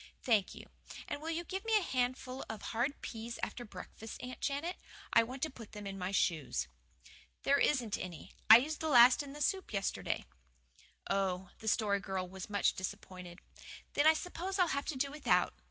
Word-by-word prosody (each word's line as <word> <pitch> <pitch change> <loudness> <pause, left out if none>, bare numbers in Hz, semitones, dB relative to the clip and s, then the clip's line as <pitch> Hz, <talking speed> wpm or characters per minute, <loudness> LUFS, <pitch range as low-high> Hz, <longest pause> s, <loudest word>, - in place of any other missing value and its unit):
"Thank 215 -6 +2
you. - - -10 0.4
And 290 - -4
will 320 - -4
you 330 +1 -1
give 380 +3 -4
me 450 -1 +3
a - - +2
handful 255 -1 -1
of 220 - -5
hard 245 +6 -1
peas 230 +1 -5
after 245 - -3
breakfast, 215 +1 -9
Aunt 255 0 -7
Janet? 295 +6 -2 0.4
I 230 - +8
want 255 +4 -5
to 315 - +1
put 230 -5 -12
them 210 -1 -7
in 195 0 -5
my 180 0 -2
shoes." 150 - 0 0.8
"There 280 +1 +4
isn't 245 -8 +2
any; 175 -3 -7 0.2
I 220 - +13
used 300 +5 -2
the 320 - -2
last 245 -1 +8
in 280 -1 -8
the 295 - -8
soup 380 +6 0
yesterday." 200 -2 -2 0.8
"Oh!" 190 -2 -1
The 220 - -8
Story 210 -2 +2
Girl 190 -1 -3
was 190 +2 -8
much 205 -1 +2
disappointed. 180 -1 -7 0.5
"Then 290 - +4
I 315 - +9
suppose 360 +3 -4
I'll 360 -3 +4
have 280 -1 -1
to 305 - -3
do 275 +1 0
without. 300 +1 +2
240 Hz, 190 wpm, -34 LUFS, 195-290 Hz, 0.8 s, I